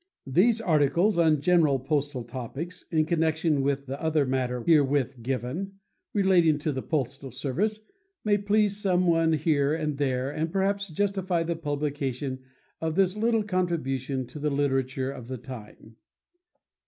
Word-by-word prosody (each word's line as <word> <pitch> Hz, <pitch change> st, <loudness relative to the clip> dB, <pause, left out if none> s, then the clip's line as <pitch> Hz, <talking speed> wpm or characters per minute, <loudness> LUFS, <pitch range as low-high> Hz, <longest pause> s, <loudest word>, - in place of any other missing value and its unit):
These 195 Hz, -, +3 dB
articles 170 Hz, +3 st, +2 dB
on 155 Hz, -3 st, +4 dB
general 160 Hz, -4 st, +4 dB
postal 140 Hz, -1 st, -2 dB
topics 135 Hz, +9 st, -7 dB
in 155 Hz, -2 st, +2 dB
connection 160 Hz, -2 st, +1 dB
with 140 Hz, 0 st, -1 dB
the 135 Hz, +1 st, -6 dB
other 160 Hz, -3 st, +2 dB
matter 125 Hz, -2 st, -1 dB
herewith 140 Hz, -5 st, +2 dB
given, 130 Hz, +10 st, -3 dB, 0.4 s
relating 180 Hz, -6 st, +4 dB
to 150 Hz, +1 st, -2 dB
the 130 Hz, -2 st, -3 dB, 0.5 s
service, 200 Hz, -, -1 dB, 0.5 s
may 205 Hz, -1 st, +3 dB
please 205 Hz, 0 st, +1 dB
some 185 Hz, -2 st, +2 dB
one 165 Hz, -1 st, +3 dB
here 150 Hz, -2 st, +2 dB
and 150 Hz, -3 st, -3 dB
there 130 Hz, -1 st, 0 dB
and 160 Hz, +2 st, -2 dB
perhaps 200 Hz, +1 st, 0 dB
justify 190 Hz, -1 st, 0 dB
the 170 Hz, 0 st, -2 dB
publication 145 Hz, -4 st, -3 dB, 0.4 s
of 160 Hz, -1 st, -1 dB
this 190 Hz, 0 st, +3 dB
little 225 Hz, 0 st, +1 dB
contribution 140 Hz, -, -1 dB
to 150 Hz, -, -10 dB
the 150 Hz, +1 st, 0 dB
literature 135 Hz, -2 st, 0 dB
of 125 Hz, -4 st, -9 dB
the 130 Hz, 0 st, -5 dB
time. 115 Hz, -3 st, -11 dB
150 Hz, 140 wpm, -27 LUFS, 135-180 Hz, 0.5 s, on